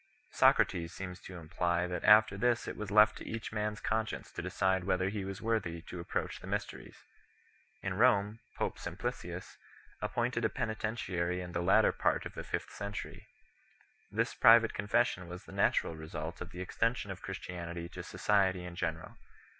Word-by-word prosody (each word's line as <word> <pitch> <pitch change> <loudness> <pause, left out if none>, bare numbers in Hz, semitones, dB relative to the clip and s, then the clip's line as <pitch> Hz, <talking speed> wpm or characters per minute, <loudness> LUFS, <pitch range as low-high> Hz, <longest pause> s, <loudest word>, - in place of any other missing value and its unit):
Socrates 85 -1 +3
3 95 - -4
seems 90 -1 -8
to 90 - -9
imply 85 +1 0
that 90 0 -4
after 110 -1 +7
this 120 +3 +1
it - - -4
was 105 -2 -5
left 105 +1 +5
to - - -9
each 115 0 -4
man 105 0 -1
s 105 - -10
conscience 110 0 -2
to - - -5
decide 95 -1 0
whether 95 0 +1
he 100 -1 -3
was 95 +3 -6
worthy 95 -8 -1
to 90 - -8
approach 85 - -3
the - - -10
mysteries. - - -4 0.9
In 95 - -1
Kome, 105 0 +3 0.2
pope - - -2
Sim - - -6
plicius - - -5 0.4
appointed 120 0 -1
a 110 - +3
penitentiary 110 -7 -2
in 90 -1 -6
the 85 - -1
latter 95 +5 +5
part - - 0
of - - -6
the - - -6
fifth - - -4
century. 100 0 -6 0.8
This - - 0
private 115 0 +7
confession 105 -3 +1
was 90 +1 -8
the - - -13
natural 80 - +2
result 80 +1 -6
of 90 - -5
the 90 -2 -7
extension 115 +2 -1
of 95 - -8
Christianity 85 -2 -5
to 90 - -7
society 95 0 +1
in 90 -1 -7
general. 80 -3 -4
95 Hz, 180 wpm, -32 LUFS, 90-110 Hz, 0.9 s, after